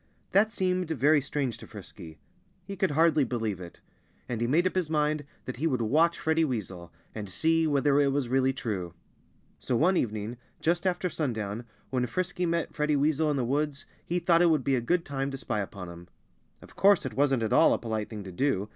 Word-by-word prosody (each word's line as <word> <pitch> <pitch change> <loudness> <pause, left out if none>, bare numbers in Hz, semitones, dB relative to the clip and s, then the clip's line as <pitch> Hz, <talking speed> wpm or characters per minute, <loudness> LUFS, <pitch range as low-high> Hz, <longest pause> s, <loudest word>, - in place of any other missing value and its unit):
That 215 +3 +4
seemed 185 -4 -1
very 150 0 +3
strange 135 -3 -3
to - - -11
Frisky. 80 -1 -11 0.5
He 200 - -6
could 190 0 +1
hardly 155 0 +3
believe 110 -7 -2
it. 85 -1 -11 0.5
And 120 -2 -3
he 120 - +1
made 160 +8 +3
up 185 - +1
his 180 -4 -1
mind 150 -1 0 0.2
that 130 - -5
he 155 +6 0
would 130 -6 0
watch 160 +9 +3
Freddie 160 +1 +1
Weasel 95 - -4 0.2
and 105 -3 -6
see 160 - +2
whether 145 -1 +3
it 140 - +3
was 140 -2 0
really 130 +1 +2
true. 95 -10 -4 0.6
So 125 - -1
one 180 +9 +3
evening, 110 +1 -2 0.2
just 175 +3 +1
after 180 0 0
sundown, 115 - -3 0.3
when 125 -1 0
Frisky 180 +6 -2
met 170 0 -1
Freddie 150 0 +1
Weasel 150 +2 +2
in 145 - 0
the 125 - 0
woods, 140 +2 -1 0.2
he 175 - -2
thought 170 -1 +3
it 175 - +5
would 155 -5 +2
be 135 +1 +2
a 125 - 0
good 170 +8 0
time 135 -1 -2
to 135 - -5
spy 120 -5 -3
upon 95 -2 -6
him. 85 0 -11 0.6
Of - - -16
course 200 -5 +4
it 130 - -4
wasn't 135 -1 +2
at 110 - 0
all - - +6
a - - +3
polite 110 -2 -3
thing 105 -3 -7
to 95 - -8
do. 105 -1 0
140 Hz, 215 wpm, -28 LUFS, 115-160 Hz, 0.6 s, all